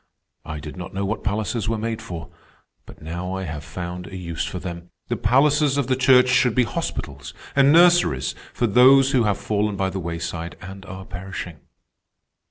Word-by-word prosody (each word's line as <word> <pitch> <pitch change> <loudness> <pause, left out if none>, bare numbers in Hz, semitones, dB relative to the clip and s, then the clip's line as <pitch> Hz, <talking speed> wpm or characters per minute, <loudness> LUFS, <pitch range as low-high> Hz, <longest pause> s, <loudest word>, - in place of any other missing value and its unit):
"I 75 -1 -6
did 75 +4 -9
not 90 +1 -8
know 100 +1 -1
what 105 +3 -3
palaces 105 +1 -1
were 115 - 0
made 115 +1 -3
for, 85 -1 -7 0.6
but - - -14
now 90 +4 -4
I 95 - -4
have 75 -4 -6
found 90 +3 -6
a 95 - -9
use 85 -3 -4
for - - -4
them. 85 -1 -7 0.2
The - - 0
palaces 145 +2 +3
of 140 - +1
the 130 +1 +1
Church 130 0 +5
should 125 -2 +3
be 125 - +4
hospitals 70 - -5 0.2
and 140 0 +5
nurseries 170 - +4 0.2
for 120 - -1
those 130 +5 +6
who 125 -5 +3
have 100 -2 +1
fallen 105 -1 -1
by 95 -1 -1
the 95 - -4
wayside 85 0 -5
and 95 +1 -10
are 95 +1 -8
perishing." 90 -3 -7
95 Hz, 185 wpm, -23 LUFS, 85-125 Hz, 0.6 s, those